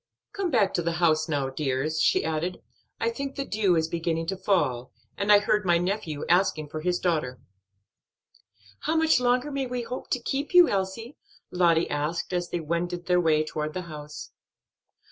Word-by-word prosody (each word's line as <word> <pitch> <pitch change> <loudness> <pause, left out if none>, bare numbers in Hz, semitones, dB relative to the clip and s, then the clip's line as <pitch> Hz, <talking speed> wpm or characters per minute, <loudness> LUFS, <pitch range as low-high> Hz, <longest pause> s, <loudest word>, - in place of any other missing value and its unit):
"Come 395 -3 -2
back 220 - +2
to 175 - 0
the 170 0 -1
house 160 -2 +2
now, 140 -3 -1
dears," 145 +2 -1
she - - +3
added, 160 +3 -3 0.4
"I 230 - 0
think 275 +3 -5
the 275 - -3
dew 205 -6 +1
is 160 -1 +1
beginning 165 0 -2
to 195 - -1
fall, 170 -11 0 0.2
and 200 +1 +1
I 205 - +9
heard 210 +1 +1
my 175 -2 +3
nephew 175 -4 -2
asking 170 -4 +2
for 155 +1 -5
his 180 +2 0
daughter." 150 -10 -1 1.4
"How 320 - -1
much 320 -4 +4
longer 250 +3 +1
may 275 -2 -2
we 245 -1 -3
hope 250 +2 -7
to 250 - 0
keep 280 +7 -3
you, 355 -1 +9
Elsie?" 200 +6 -3 0.3
Lottie 170 -2 +3
asked 150 +5 -2
as 175 -1 -1
they 175 - -2
wended 170 +2 -3
their 180 0 +3
way 155 -2 +3
toward 155 0 -4
the 185 - -3
house. 150 -3 -9
175 Hz, 185 wpm, -26 LUFS, 155-215 Hz, 1.4 s, I